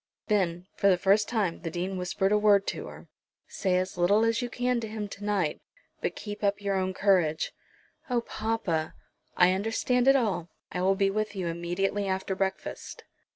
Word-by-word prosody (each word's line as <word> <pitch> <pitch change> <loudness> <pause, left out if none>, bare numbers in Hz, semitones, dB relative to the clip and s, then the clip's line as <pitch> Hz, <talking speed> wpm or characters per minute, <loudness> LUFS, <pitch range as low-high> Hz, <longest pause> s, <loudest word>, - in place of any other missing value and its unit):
Then 180 -4 +1
for 200 - +3
the 185 - +4
first 200 +3 +3
time 205 -8 -1
the 165 - -3
Dean 180 +3 -3
whispered 185 +2 0
a 210 - +5
word 205 -2 +5
to - - -5
her. - - -11 0.4
"Say 185 -2 0
as 185 0 -2
little 200 +6 +4
as 230 +1 +1
you 245 - -3
can 245 0 0
to 225 - -4
him 215 -1 -4
to 200 +1 -10
night, 195 -7 0 0.4
but - - -2
keep 205 0 -7
up 200 0 +2
your 195 -2 0
courage." 185 -5 +2 0.6
"Oh, 245 -1 +1
papa!" 215 -9 -2 0.4
"I 180 0 +6
understand 225 +5 +1
it 270 - +7
all. 195 -9 0 0.2
I 180 - -2
will 190 +1 +3
be 195 0 +2
with 215 0 -2
you 185 -2 -3
immediately 175 +4 -1
after 190 0 -1
breakfast." 190 0 -4
195 Hz, 185 wpm, -28 LUFS, 180-215 Hz, 0.6 s, it